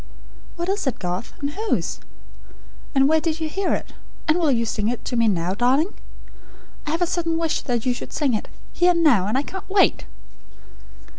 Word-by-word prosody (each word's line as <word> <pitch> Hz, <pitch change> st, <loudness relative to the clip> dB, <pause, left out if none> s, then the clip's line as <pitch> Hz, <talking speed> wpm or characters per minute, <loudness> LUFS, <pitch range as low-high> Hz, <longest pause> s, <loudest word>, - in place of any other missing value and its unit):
'" -, -, -22 dB
"What 345 Hz, 0 st, -3 dB
is 390 Hz, -5 st, -1 dB
it, 265 Hz, -, 0 dB
Garth? 180 Hz, +4 st, -4 dB
And 280 Hz, 0 st, -1 dB
whose? 430 Hz, +6 st, -1 dB, 1.0 s
And 270 Hz, 0 st, +5 dB
where 315 Hz, +1 st, +3 dB
did 325 Hz, 0 st, -1 dB
you 320 Hz, -, -1 dB
hear 390 Hz, +5 st, 0 dB
it? -, -, -7 dB, 0.3 s
And 310 Hz, +3 st, +3 dB
will 325 Hz, -3 st, +3 dB
you 230 Hz, -3 st, +2 dB
sing 210 Hz, -1 st, -1 dB
it 240 Hz, +1 st, -3 dB
to 245 Hz, -, -2 dB
me 230 Hz, -1 st, +3 dB
now, 180 Hz, -3 st, +1 dB
darling? 265 Hz, -, +2 dB, 0.9 s
I -, -, -1 dB
have 330 Hz, +3 st, +1 dB
a -, -, +4 dB
sudden 330 Hz, -1 st, -1 dB
wish 330 Hz, -1 st, 0 dB
that 240 Hz, -3 st, -2 dB
you 250 Hz, -, +2 dB
should -, -, -7 dB
sing 285 Hz, -5 st, 0 dB
it, 215 Hz, -, -2 dB, 0.3 s
here 355 Hz, 0 st, +4 dB
and 340 Hz, -1 st, +1 dB
now; 230 Hz, -, +5 dB
and 215 Hz, -, +1 dB
I 275 Hz, -, +1 dB
can't 380 Hz, +4 st, -8 dB
wait!" 390 Hz, 0 st, +3 dB
295 Hz, 210 wpm, -23 LUFS, 235-335 Hz, 1.0 s, And